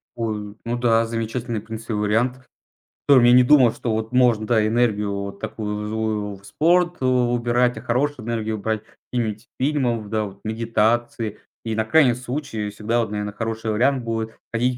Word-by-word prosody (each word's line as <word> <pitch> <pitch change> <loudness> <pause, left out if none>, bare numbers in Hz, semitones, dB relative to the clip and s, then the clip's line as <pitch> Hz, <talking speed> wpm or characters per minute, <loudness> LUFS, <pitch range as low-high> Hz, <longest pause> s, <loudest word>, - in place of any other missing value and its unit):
Ой, 105 -3 -4
ну 120 +1 -2
да, 115 -1 +3
замечательный, 115 0 -3
в - - -13
принципе, 115 +1 -6
вариант. 120 +5 0 0.6
Котором 130 -4 +7
я 120 - +7
не 125 - +8
думал, 125 -4 +6
что 115 - -3
вот 110 +2 -3
можно, 120 -4 +3
да, 110 -2 +3
энергию 110 -3 +1
вот 100 0 -5
такую 105 -1 -4
злую 110 -2 -2
в 100 - -20
спорт 175 - +2
у 130 - +2 0.3
убирать, 120 +1 +1
а - - -10
хорошую 130 0 -1
энергию 110 -2 -2
брать 110 +1 -2 0.3
имить 115 -1 -2
фильмов, 125 -7 0
да, 110 -1 0
вот 100 0 -9
медитации. 115 0 0 0.3
И 115 -1 -2
на 110 0 0
крайний 140 -3 +5
случай 125 -4 -4
всегда 110 +3 -1
вот, 110 -3 -2
наверное, 105 -1 -3
хороший 110 0 -3
вариант 130 +4 +2
будет- 110 -1 -3 0.2
ходить 125 +2 +1
115 Hz, 175 wpm, -22 LUFS, 110-125 Hz, 0.6 s, не